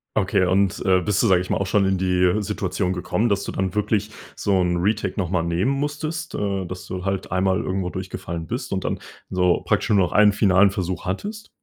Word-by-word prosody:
Okay 95 Hz, -, +2 dB
und, 95 Hz, +1 st, +2 dB
äh, 95 Hz, -1 st, +4 dB
bist 100 Hz, +2 st, +1 dB
du, 115 Hz, -, +3 dB
sage 95 Hz, -3 st, +4 dB
ich 90 Hz, -, -6 dB
mal, -, -, +2 dB
auch 100 Hz, -, -2 dB
schon 100 Hz, +1 st, +2 dB
in 95 Hz, 0 st, +1 dB
die 90 Hz, +2 st, +2 dB
Situation 95 Hz, -3 st, -2 dB
gekommen, 105 Hz, +5 st, -1 dB
dass 100 Hz, -1 st, +1 dB
du -, -, -4 dB
dann 95 Hz, 0 st, -2 dB
wirklich 105 Hz, 0 st, 0 dB, 0.3 s
so 100 Hz, -2 st, +1 dB
'n 90 Hz, -1 st, +1 dB
Retake 100 Hz, +2 st, 0 dB
nochmal 90 Hz, -2 st, 0 dB
nehmen 85 Hz, +9 st, 0 dB
musstest, 155 Hz, +4 st, -3 dB
äh, 100 Hz, -2 st, -2 dB
dass 90 Hz, +1 st, -8 dB
du 90 Hz, 0 st, -5 dB
halt 95 Hz, -1 st, -2 dB
einmal 95 Hz, 0 st, +2 dB
irgendwo 95 Hz, -1 st, -2 dB
durchgefallen 85 Hz, -3 st, -5 dB
bist -, -, -4 dB
und -, -, -2 dB
dann -, -, -2 dB, 0.3 s
so 90 Hz, -1 st, +2 dB
praktisch -, -, +1 dB
nur 105 Hz, -2 st, +4 dB
noch 90 Hz, -2 st, +2 dB
einen 105 Hz, -1 st, +5 dB
finalen 100 Hz, -1 st, +4 dB
Versuch 95 Hz, -2 st, -3 dB
hattest. 205 Hz, -, -4 dB
95 Hz, 215 wpm, -23 LUFS, 90-105 Hz, 0.3 s, einen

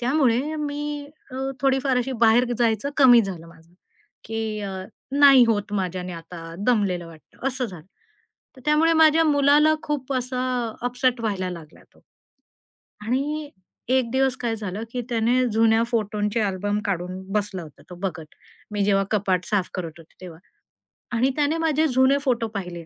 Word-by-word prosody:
त्यामुळे 265 Hz, +2 st, +1 dB
मी 295 Hz, 0 st, -4 dB, 0.2 s
अ, 255 Hz, -, -8 dB, 0.2 s
थोडी 270 Hz, -1 st, +3 dB
फार 260 Hz, -2 st, +2 dB
अशी 260 Hz, +2 st, -2 dB
बाहेर 230 Hz, +2 st, +5 dB
जायचं 230 Hz, +3 st, +1 dB
कमी 245 Hz, -4 st, +8 dB
झालं 180 Hz, -5 st, -6 dB
माझं, 165 Hz, 0 st, -19 dB, 0.5 s
की 225 Hz, 0 st, -4 dB, 0.2 s
अ, 190 Hz, -2 st, -5 dB, 0.3 s
नाही 275 Hz, -3 st, +7 dB
होत 205 Hz, -2 st, 0 dB
माझ्याने 185 Hz, -2 st, -3 dB
आता 165 Hz, 0 st, -9 dB, 0.2 s
दमलेलं 195 Hz, -8 st, +1 dB
वाटतं 165 Hz, -, -11 dB
असं 255 Hz, -1 st, -3 dB
झालं. 180 Hz, -6 st, -11 dB, 0.7 s
तर -, -, -14 dB
त्यामुळे 310 Hz, +2 st, +4 dB
माझ्या 320 Hz, 0 st, +5 dB
मुलाला 295 Hz, +1 st, +4 dB
खूप 280 Hz, -2 st, -3 dB
असा 255 Hz, 0 st, -2 dB, 0.4 s
अपसेट 250 Hz, 0 st, 0 dB
व्हायला 195 Hz, -4 st, -2 dB
लागला 165 Hz, -3 st, -11 dB
तो -, -, -23 dB, 1.1 s
आणि 290 Hz, +4 st, -2 dB, 0.4 s
एक 255 Hz, -2 st, +2 dB
दिवस 265 Hz, 0 st, +1 dB
काय 230 Hz, -2 st, -1 dB
झालं, 205 Hz, 0 st, -5 dB
की 250 Hz, -, -2 dB
त्याने 240 Hz, +2 st, +2 dB
जुन्या 225 Hz, 0 st, +4 dB
फोटोंचे 210 Hz, -1 st, -1 dB
अल्बम 205 Hz, 0 st, -1 dB
काढून 185 Hz, -1 st, -3 dB
बसला 205 Hz, -4 st, -2 dB
होता 155 Hz, -3 st, -14 dB
तो -, -, -7 dB
बघत. 175 Hz, -5 st, -5 dB, 0.4 s
मी 205 Hz, -1 st, 0 dB
जेव्हा 195 Hz, -1 st, +2 dB
कपाट 190 Hz, -3 st, +1 dB
साफ 195 Hz, -4 st, 0 dB
करत 170 Hz, -3 st, -5 dB
होते 165 Hz, -, -18 dB
तेव्हा 170 Hz, -3 st, -10 dB, 0.8 s
आणि 255 Hz, +4 st, +3 dB
त्याने 295 Hz, +2 st, +1 dB
माझे 315 Hz, -1 st, +2 dB
जुने 260 Hz, +1 st, +3 dB
फोटो 240 Hz, -4 st, 0 dB
पाहिले. 175 Hz, -4 st, -5 dB
230 Hz, 155 wpm, -23 LUFS, 190-270 Hz, 1.1 s, कमी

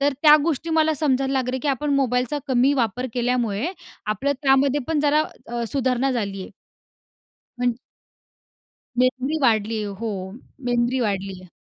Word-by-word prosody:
तर 285 Hz, 0 st, +2 dB
त्या 300 Hz, -1 st, +9 dB
गोष्टी 330 Hz, 0 st, -1 dB
मला 315 Hz, -1 st, +3 dB
समजायला 270 Hz, -2 st, +1 dB
लागले 260 Hz, -1 st, 0 dB
की 295 Hz, -, -1 dB
आपण 285 Hz, +2 st, 0 dB
मोबाईलचा 255 Hz, +1 st, +1 dB
कमी 260 Hz, +2 st, +3 dB
वापर 250 Hz, 0 st, 0 dB
केल्यामुळे 240 Hz, -2 st, 0 dB, 0.4 s
आपलं 270 Hz, +7 st, 0 dB
त्यामध्ये 275 Hz, +1 st, +3 dB
पण 320 Hz, -2 st, +1 dB
जरा 300 Hz, +1 st, +3 dB, 0.2 s
अ, 235 Hz, 0 st, -3 dB
सुधारणा 260 Hz, -1 st, +1 dB
झाली 200 Hz, -5 st, -3 dB
आहे. -, -, -10 dB, 1.1 s
म्हणजे 245 Hz, -1 st, +1 dB, 1.2 s
मेमरी 260 Hz, +4 st, +1 dB
वाढली 225 Hz, -2 st, +2 dB
आहे. 205 Hz, -, -4 dB
हो, 225 Hz, +3 st, -4 dB, 0.5 s
मेमरी 245 Hz, +1 st, +1 dB
वाढली 195 Hz, -4 st, -2 dB
आहे. 185 Hz, -, -14 dB
255 Hz, 145 wpm, -23 LUFS, 235-280 Hz, 1.2 s, त्या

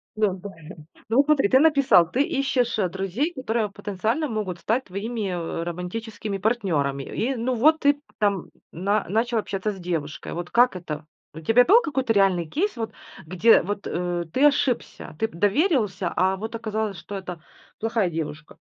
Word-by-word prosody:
Да. 215 Hz, -2 st, +2 dB, 0.8 s
Ну 230 Hz, -, +1 dB
вот 280 Hz, -, +6 dB
смотри, 285 Hz, -9 st, +3 dB
ты 260 Hz, -, +6 dB
написал: 275 Hz, -, +5 dB
ты 265 Hz, -, +1 dB
ищешь, 265 Hz, -5 st, 0 dB
э, 190 Hz, -3 st, +2 dB
друзей, 195 Hz, -, -2 dB
которые 225 Hz, -5 st, -2 dB
потенциально 215 Hz, -, -2 dB
могут 200 Hz, -6 st, -3 dB
стать 240 Hz, +8 st, 0 dB
твоими, 205 Hz, +2 st, -4 dB
э, 170 Hz, -1 st, -3 dB
романтическими 200 Hz, +4 st, -5 dB
партнерами. 175 Hz, -, 0 dB
И 250 Hz, -, -2 dB
ну 245 Hz, +2 st, -1 dB
вот, 310 Hz, +7 st, +4 dB
ты 285 Hz, 0 st, +3 dB, 0.2 s
там 200 Hz, -4 st, 0 dB, 0.2 s
на 200 Hz, +4 st, -1 dB
начал 230 Hz, +2 st, +1 dB
общаться 205 Hz, 0 st, -2 dB
с 195 Hz, -, -9 dB
девушкой. 165 Hz, -4 st, -4 dB
Вот 175 Hz, +1 st, -5 dB
как 245 Hz, -4 st, +4 dB
это? 155 Hz, -3 st, -6 dB, 0.3 s
У 160 Hz, -, -8 dB
тебя 225 Hz, +10 st, +4 dB
был 450 Hz, +7 st, +6 dB
какой-то 265 Hz, -, 0 dB
реальный 190 Hz, -4 st, +3 dB
кейс, 330 Hz, -, -2 dB
вот 225 Hz, -1 st, -3 dB, 0.3 s
где 185 Hz, +7 st, +4 dB
вот, 205 Hz, +2 st, -4 dB
э, 175 Hz, 0 st, -2 dB
ты 280 Hz, +3 st, +3 dB
ошибся, 270 Hz, -, 0 dB
ты 225 Hz, -, 0 dB
п 195 Hz, -, -16 dB
доверился, 205 Hz, -, +1 dB
а 190 Hz, +2 st, +2 dB
вот 220 Hz, +3 st, -6 dB
оказалось, 220 Hz, -3 st, -3 dB
что 205 Hz, -, -8 dB
это 180 Hz, -4 st, -7 dB, 0.4 s
плохая 225 Hz, -5 st, 0 dB
девушка? 155 Hz, -1 st, -5 dB
210 Hz, 170 wpm, -24 LUFS, 180-245 Hz, 0.8 s, вот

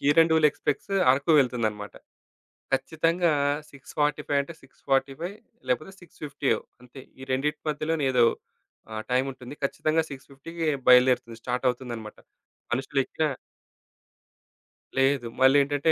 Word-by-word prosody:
Kirandul 160 Hz, +2 st, +5 dB
express 150 Hz, +8 st, -3 dB, 0.2 s
Araku 140 Hz, +5 st, +2 dB
వెళ్తుందన్నమాట. 110 Hz, -6 st, 0 dB, 0.8 s
ఖచ్చితంగా 165 Hz, +4 st, +1 dB, 0.4 s
6:45 145 Hz, +1 st, -1 dB
అంటే 165 Hz, +4 st, -10 dB
6:45 135 Hz, +6 st, -2 dB, 0.3 s
లేకపోతే 155 Hz, +9 st, -1 dB
సిక్స్ 175 Hz, -, -19 dB
ఫిఫ్టీయో, 140 Hz, -5 st, 0 dB, 0.2 s
అంతే 125 Hz, +2 st, -12 dB, 0.2 s
ఈ 130 Hz, -, -7 dB
రెండిటి 150 Hz, +3 st, -1 dB
మధ్యలోనే 155 Hz, 0 st, -1 dB
ఏదో 120 Hz, -2 st, +5 dB, 0.7 s
ఆహ్, 110 Hz, 0 st, -4 dB
టైముంటుంది. 130 Hz, 0 st, -2 dB
ఖచ్చితంగా 155 Hz, +3 st, +1 dB
6:50కి 140 Hz, +5 st, -7 dB, 0.2 s
బయలుదేరుతుంది. 125 Hz, -2 st, +5 dB
స్టార్ట్ 125 Hz, +2 st, -2 dB
అవుతుందన్నమాట. 120 Hz, -4 st, -5 dB, 0.6 s
మనుషులు 135 Hz, +2 st, -1 dB
ఎక్కినా 155 Hz, +3 st, -1 dB, 1.7 s
లేదు. 135 Hz, -2 st, +2 dB
మళ్ళీ 130 Hz, +2 st, +7 dB
ఏంటంటే, 145 Hz, +3 st, +1 dB
135 Hz, 105 wpm, -26 LUFS, 125-155 Hz, 1.7 s, మళ్ళీ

